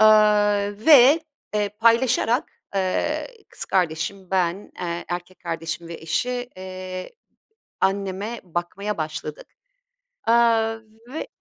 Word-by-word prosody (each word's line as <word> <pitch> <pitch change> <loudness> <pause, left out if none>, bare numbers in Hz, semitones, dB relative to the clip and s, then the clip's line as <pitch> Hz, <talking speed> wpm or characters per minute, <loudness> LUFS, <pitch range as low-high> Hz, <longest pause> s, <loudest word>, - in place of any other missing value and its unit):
eee, 210 -1 +4
ve, 290 +1 +8 0.3
eee, 205 -1 +1
paylaşarak, 235 - +2 0.2
eee, 190 -1 0 0.2
kız - - -6
kardeşim, 180 +2 -1
ben, 185 +1 0
eee, 170 -1 -3
erkek 175 +1 -5
kardeşim 165 0 -4
ve 170 - -6
eşi, 245 +11 -2
eee, 185 0 -6 0.7
anneme 195 +3 -1
bakmaya 180 +4 -3
başladık, 155 -1 -5 0.8
eee, 230 - +5 0.8
ve 315 - -4
195 Hz, 100 wpm, -23 LUFS, 175-215 Hz, 0.8 s, ve